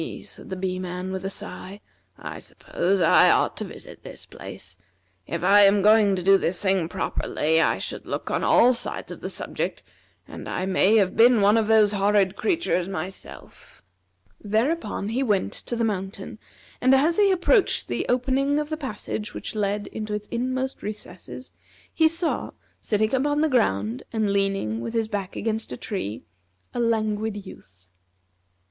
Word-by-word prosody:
said - - -6
the 190 - -4
Bee 185 0 -3
man 180 0 -5
with 190 0 -4
a 195 - -2
sigh, 195 0 -6 0.4
"I - - -7
suppose 190 +2 -2
I 165 - +6
ought - - +2
to - - -3
visit - - -10
this - - -10
place. - - -11 0.5
If - - -4
I 205 +1 +6
am 200 0 +5
going 210 -2 +5
to 180 - -4
do 195 +1 +6
this 175 +2 -1
thing 190 -4 +1
properly, 160 -2 0
I - - +2
should - - -6
look - - -4
on - - 0
all 250 +2 +5
sides 240 - -6
of - - -9
the - - -4
subject, - - -3 0.4
and - - -8
I 185 - -2
may 190 +2 +3
have 195 -4 +3
been 235 0 +6
one 205 +1 +5
of 225 -2 +2
those 215 -2 +5
horrid 200 -1 +2
creatures 325 - 0
myself." 185 - -9 0.6
Thereupon 220 +1 -1
he 240 +4 -1
went 210 -7 0
to 240 - -5
the 235 - -1
mountain, 195 -1 -4 0.4
and 255 +1 +5
as 310 +5 +2
he 410 -1 +5
approached 380 +3 +2
the - - -2
opening 270 +3 +1
of 300 0 -2
the 310 - -3
passage 255 -6 -5
which - - -5
led 205 -1 -1
into 215 -1 -5
its 210 0 -6
inmost 260 +2 -2
recesses 210 +3 -8 0.4
he 320 - +4
saw, 330 +1 -1 0.3
sitting 215 +1 0
upon 290 +3 +1
the 315 - +2
ground, 115 - +1
and 215 -3 0
leaning 195 - -1
his 225 -1 -1
back 200 -3 -4
against 220 0 -3
a - - -5
tree, 185 - -5 0.5
a - - -3
Languid 215 -2 -1
Youth. 90 - -15
210 Hz, 170 wpm, -24 LUFS, 190-240 Hz, 0.6 s, I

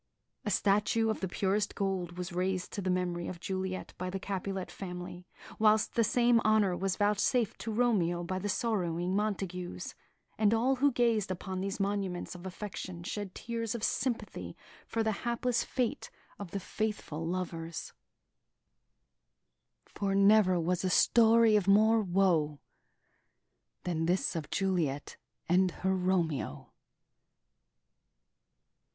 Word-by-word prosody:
A - - 0
statue 210 +2 +2
of - - -4
the 190 - -2
purest 195 +2 0
gold 185 -3 -2
was 180 0 -5
raised 185 0 -1
to 200 - -3
the 185 - -2
memory 180 -1 -1
of 175 - -6
Juliet 185 0 -4
by 185 0 -2
the 195 +1 -4
Capulet 195 -1 -4
family, 180 -1 -7 0.3
whilst 215 0 +4
the 230 - +3
same 240 +1 +4
honour 215 -4 +3
was 190 0 -1
vouchsafed 210 +2 +1
to 225 - -4
Romeo 200 -7 +1
by 185 +2 -3
the 205 +2 -3
sorrowing 185 -5 0
Montagues; 190 -4 -3 0.5
and 215 0 +4
all 255 +4 +2
who 285 +2 +4
gazed 230 -5 +1
upon 185 0 -4
these 195 +1 -3
monuments 195 -3 -2
of 180 +1 -8
affection 185 -2 -6
shed 205 -1 -5
tears 230 -1 -3
of 225 - -5
sympathy 240 0 -2 0.3
for 225 - -1
the 220 - +1
hapless 240 0 0
fate 250 -3 -2 0.3
of 200 -3 -6
the 200 - -3
faithful 200 -6 -3
lovers: 165 -1 -4 1.9
"For 195 -1 -2
never 200 -2 +5
was 175 +2 0
a 185 - +1
story 230 +2 +5
of 200 -3 +2
more 220 +3 +5
woe 175 -6 +2 1.2
Than 165 -2 -1
this 180 +1 +1
of 160 -2 -4
Juliet 170 -8 -1 0.3
and 185 +2 +4 0.2
her 190 0 +3
Romeo!" 180 -5 -1
195 Hz, 135 wpm, -31 LUFS, 180-215 Hz, 1.9 s, never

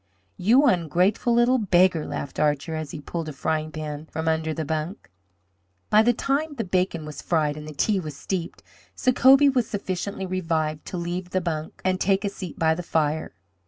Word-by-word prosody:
"You 230 +9 +5
ungratefu' 180 - +2
little 240 +2 +4
beggar!" 180 -5 +3
laughed 140 - -5
Archer, 150 +2 +1
as 155 -2 -4
he 160 - -7
pulled 160 +2 -5
a - - -6
frying 155 +2 -2
pan 155 0 -6
from 160 +1 -4
under 160 0 +1
the 155 0 -3
bunk. 155 - -4 0.8
By 215 - +7
the 235 +2 +4
time 285 +5 -1
the 230 - -2
bacon 180 -4 -1
was 150 -2 -7
fried 155 -3 +1
and 150 0 -8
the 155 - -7
tea 195 +6 +1
steeped, 170 +4 -5 0.3
Sacobie 270 +2 +5
was 250 -4 +1
sufficiently 195 -1 -3
revived 165 -4 -2
to 180 - -4
leave 175 +1 -4
the 185 - 0
bunk 160 -3 -4
and 185 0 +1
take 195 +1 +2
a - - +1
seat 185 -4 -8
by 160 -1 +3
the 170 - -4
fire. 155 - -1
170 Hz, 185 wpm, -24 LUFS, 155-195 Hz, 0.8 s, By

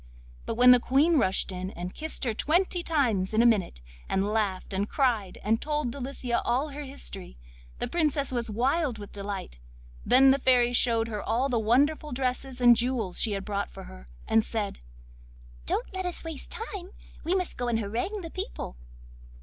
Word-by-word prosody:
But - - -1
when 250 +2 +8
the 250 - +8
Queen 290 +6 +3
rushed 190 -3 +1
in, 185 0 -4
and 180 -1 -6
kissed 315 0 -5
her 235 -4 0
twenty 350 - +1
times 230 - 0
in 225 - +5
a - - +3
minute, 200 - +2 0.3
and 190 +1 +1
laughed, 200 -3 -1
and 200 +2 -1
cried, 235 -9 0
and 225 +3 +1
told 295 -4 -1
Delicia 255 -2 -3
all 265 +6 0
her 290 +1 -7
history, 265 - -7 0.4
the - - -2
Princess 300 -5 0
was 240 -2 -2
wild 260 +4 0
with 205 -1 -9
delight. 200 - -6 0.4
Then 265 +2 +6
the 275 - +2
Fairy 245 -2 +4
showed 230 -2 +3
her 210 -3 -4
all 245 +5 0
the 240 -3 +1
wonderful 285 +7 +2
dresses 255 0 -2
and 240 -1 +7
jewels 235 -6 -1
she 215 - +1
had 195 -1 -4
brought 200 -1 -2
for - - -10
her, 60 0 -12 0.2
and 225 0 +4
said: 215 -2 -3 0.9
'Don't 245 - -2
let 375 -1 -2
us 355 - -4
waste 325 -4 -7
time; 400 -5 -6 0.3
we 340 +4 +1
must 365 -2 -1
go 245 - -3
and 235 -2 +1
harangue 235 - -3
the 330 -2 -7
people. 375 - -5
245 Hz, 185 wpm, -27 LUFS, 210-285 Hz, 0.9 s, when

